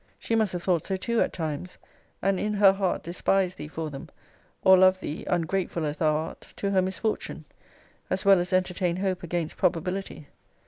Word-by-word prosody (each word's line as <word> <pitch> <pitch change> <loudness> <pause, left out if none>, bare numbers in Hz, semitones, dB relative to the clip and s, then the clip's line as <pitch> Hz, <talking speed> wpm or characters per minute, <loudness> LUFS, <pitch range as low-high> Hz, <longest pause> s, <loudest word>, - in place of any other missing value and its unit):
She - - -4
must 220 -3 +2
have 175 -1 -4
thought 175 -4 +1
so 190 - -2
too, 235 +4 0
at - - +1
times, 160 +2 -5 0.5
and 195 -1 +2
in 210 0 -1
her 200 -1 +6
heart 195 -2 -1
despised 185 +2 0
thee - - -5
for 160 0 -5
them, 135 -1 -8 0.5
or 190 - +8
love 185 0 +5
thee 155 -4 -5
(ungrateful 175 -1 -1
as 150 0 -3
thou 155 -2 +2
art!) 160 +1 -5
to 200 - -2
her 190 -1 +3
misfortune; 190 +4 -3 0.6
as 190 - -2
well 195 -2 +7
as 175 0 -2
entertain 180 -1 +1
hope 185 0 -1
against 170 -2 -3
probability. 180 -1 -1
185 Hz, 185 wpm, -26 LUFS, 170-195 Hz, 0.6 s, or